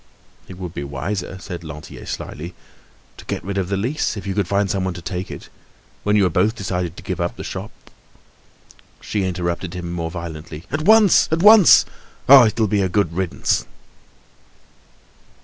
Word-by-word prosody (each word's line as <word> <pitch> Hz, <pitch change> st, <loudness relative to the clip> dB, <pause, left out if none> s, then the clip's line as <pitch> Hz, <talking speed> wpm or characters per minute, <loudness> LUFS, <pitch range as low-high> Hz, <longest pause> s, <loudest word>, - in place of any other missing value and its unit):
"It 95 Hz, -, -10 dB
would 90 Hz, -3 st, -7 dB
be 70 Hz, -, -5 dB
wiser," 90 Hz, +8 st, -4 dB
said 90 Hz, -2 st, -7 dB
Lantier 75 Hz, 0 st, -10 dB
slyly, 85 Hz, +4 st, -6 dB, 0.6 s
"to -, -, -12 dB
get -, -, -4 dB
rid 100 Hz, 0 st, -3 dB
of 95 Hz, -1 st, -2 dB
the 100 Hz, -, 0 dB
lease 120 Hz, +3 st, -1 dB
if 100 Hz, -, -7 dB
you 100 Hz, -, -2 dB
could 100 Hz, -2 st, -1 dB
find 100 Hz, +1 st, +1 dB
someone 95 Hz, -1 st, -2 dB
to 90 Hz, -, -8 dB
take 90 Hz, +2 st, -4 dB
it. -, -, -9 dB, 0.6 s
When 105 Hz, 0 st, +2 dB
you 100 Hz, -2 st, +4 dB
are -, -, +2 dB
both 100 Hz, +7 st, +1 dB
decided 90 Hz, -4 st, -3 dB
to -, -, -10 dB
give 90 Hz, -1 st, -4 dB
up 85 Hz, -, -2 dB
the -, -, -7 dB
shop—" -, -, -6 dB, 1.3 s
She 105 Hz, -2 st, -2 dB
interrupted 85 Hz, -1 st, -3 dB
him 85 Hz, -1 st, -5 dB
more 85 Hz, -1 st, -3 dB
violently: 80 Hz, -2 st, -8 dB
"At 145 Hz, +3 st, -1 dB
once, 215 Hz, -2 st, +6 dB
at 165 Hz, +2 st, +1 dB
once! 210 Hz, -3 st, +8 dB, 0.4 s
Ah! 130 Hz, -3 st, +9 dB
it'll 110 Hz, +1 st, 0 dB
be 105 Hz, -1 st, +1 dB
a 95 Hz, -, 0 dB
good 90 Hz, -3 st, 0 dB
riddance!" 90 Hz, 0 st, -1 dB
95 Hz, 180 wpm, -20 LUFS, 85-105 Hz, 1.3 s, Ah